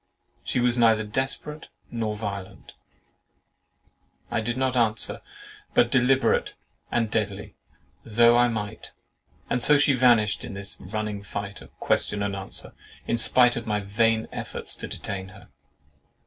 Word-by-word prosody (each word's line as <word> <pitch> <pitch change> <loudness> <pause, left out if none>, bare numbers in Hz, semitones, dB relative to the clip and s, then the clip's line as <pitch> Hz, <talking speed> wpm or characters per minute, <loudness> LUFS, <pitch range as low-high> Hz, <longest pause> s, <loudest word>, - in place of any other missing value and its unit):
—"She - - -1
was 120 0 +2
neither 110 -2 +4
desperate 135 +7 -4 0.2
nor 110 -2 -2
violent." 100 -3 -7 1.6
I 115 - 0
did 120 +3 -3
not 130 -1 0
answer—"But 120 +1 -1
deliberate 130 +1 +2 0.4
and 115 -3 0
deadly,"—though 105 - 0
I 120 0 +5
might; 110 -2 -5 0.5
and 125 - -1
so 150 +4 +7
she 145 0 +4
vanished 120 -5 +3
in 120 -5 -7
this 100 0 -7
running 105 +1 -4
fight 100 0 -6
of - - -14
question 100 0 0
and 100 -1 -2
answer, 95 -1 -6 0.3
in 115 - 0
spite 125 +1 +4
of 115 0 -5
my 105 -1 0
vain 110 +3 +1
efforts - - -4
to - - -6
detain 95 -2 -5
her. 95 - -15
110 Hz, 135 wpm, -25 LUFS, 105-120 Hz, 1.6 s, so